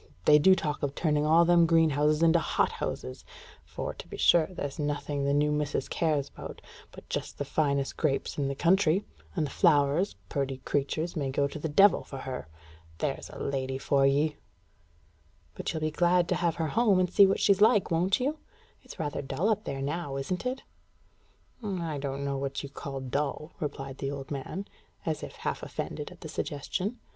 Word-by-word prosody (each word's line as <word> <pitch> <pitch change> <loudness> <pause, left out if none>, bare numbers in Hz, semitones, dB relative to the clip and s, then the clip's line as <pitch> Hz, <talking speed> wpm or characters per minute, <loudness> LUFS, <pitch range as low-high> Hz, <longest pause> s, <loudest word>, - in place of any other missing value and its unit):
They 150 - +7
do 190 +5 +6
talk 150 -4 -3
of 140 -1 -2
turning 150 -2 +1
all 165 +2 +6
them 170 -1 +5
greenhouses 155 -1 +3
into 165 +1 +5
hothouses; 65 - -2 0.4
for, - - -5
to - - -11
be - - -8
sure, 165 -2 +5
there's 145 -7 -6
nothing 145 -1 -2
the 140 - +2
new 150 +1 +2
missus 150 -2 -1
cares 150 -4 0
about - - -9 0.3
but - - -13
just - - -4
the 145 - -3
finest 140 -1 0
grapes 145 -4 0
in 140 -2 -1
the 140 - -2
country; 180 +3 +3 0.3
and 155 - +1
the 140 - -6
flowers, 150 +2 +3
purty 135 -3 -2
creatures, 155 +4 -1
may 140 -4 -1
go 140 +1 +1
to 145 - -7
the 160 - -3
devil 195 +7 +5
for 135 - -8
her. 130 -5 -6 0.5
There's - - -3
a - - -10
lady 135 -1 -2
for 135 0 +2
ye!" 145 +2 +1 1.2
"But - - -3
you'll 160 - -4
be 155 0 0
glad 175 +2 +3
to - - +2
have 170 -2 0
her 160 -2 -1
home, 210 0 +3
and 180 - +3
see 200 - +8
what 195 - +1
she's 200 0 +3
like, 210 -4 +5
won't 180 +6 +2
you? 290 +5 -1 0.4
It's - - -12
rather 150 -5 -3
dull 145 +9 -1
up 215 -1 0
there 135 0 -3
now, 145 -1 -3
isn't 180 - -2
it?" 260 +1 -3 1.0
"I 170 -7 -3
don't 140 0 -3
know 140 -1 -1
what 140 +1 -3
you 140 - -6
call 135 -1 -6
dull," 140 +4 -3
replied 135 -3 -5
the 135 - -2
old 140 -1 -6
man, 145 +8 -4 0.4
as 155 -2 -1
if - - -8
half - - -3
offended - - -5
at - - -15
the - - -7
suggestion. 185 - -3
150 Hz, 190 wpm, -29 LUFS, 140-175 Hz, 1.2 s, see